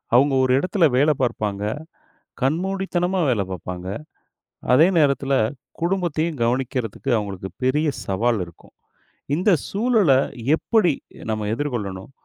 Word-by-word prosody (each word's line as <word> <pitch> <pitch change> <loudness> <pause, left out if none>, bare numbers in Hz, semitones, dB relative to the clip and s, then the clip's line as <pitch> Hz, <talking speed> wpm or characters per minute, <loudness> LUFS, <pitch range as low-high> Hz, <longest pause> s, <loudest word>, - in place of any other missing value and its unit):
அவங்க 135 +2 +5
ஒரு 130 - +2
இடத்துல 180 0 +2
வேலை 150 +2 +4
பாப்பாங்க, 105 -5 -1 0.8
கண்மூடித்தனமா 180 +4 0
வேலை 105 -5 +1
பாப்பாங்க. 90 0 -6 0.9
அதே 155 +6 +7
நேரத்துல 140 -2 +2 0.5
குடும்பத்தையும் 170 -5 -1
கவனிக்குறதுக்கு 125 +1 -1
அவங்களுக்கு 95 -2 -5
பெரிய 150 +4 +2 0.2
சவால் 110 +2 +1
இருக்கும். 85 -1 -18 0.6
இந்த 185 +6 +2 0.2
சூழலை 205 - +3 0.4
எப்படி 200 -7 +2 0.4
நம்ப 110 -1 -2
எதிர்கொள்ளணும்? 110 -8 -4
135 Hz, 105 wpm, -22 LUFS, 110-170 Hz, 0.9 s, அதே